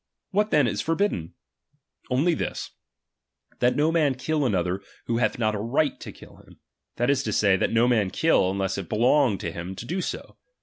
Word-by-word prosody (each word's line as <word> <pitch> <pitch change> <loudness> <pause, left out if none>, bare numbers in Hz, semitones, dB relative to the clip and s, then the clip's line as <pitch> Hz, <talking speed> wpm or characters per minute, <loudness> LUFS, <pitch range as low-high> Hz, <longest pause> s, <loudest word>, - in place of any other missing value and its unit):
What 210 +2 +1
then 150 -7 +4
is 105 -3 -1
for 165 +6 0
bidden? 125 - -1 0.7
Only 145 +7 +2
this: - - -4 0.9
that 125 0 +2
no 150 +2 +2
man 150 -5 +2
kill 145 +2 0
another, 90 -2 -1 0.2
who 115 - -1
hath 125 - +1
not 110 -2 +1
a 105 - -3
right 135 +7 0
to - - -8
kill - - -15
him; - - -19 0.4
that 120 +3 +1
is 135 -2 +1
to - - -3
say, 100 -2 +3
that - - 0
no 115 +1 +3
man 110 -6 +2
kill, 130 - +2
unless 95 0 -2
it 85 -4 -7
belong 120 0 +3
to 85 - -4
him 85 +3 -6
to 115 - -8
do 180 +9 -2
so. - - -6
120 Hz, 205 wpm, -25 LUFS, 100-150 Hz, 0.9 s, then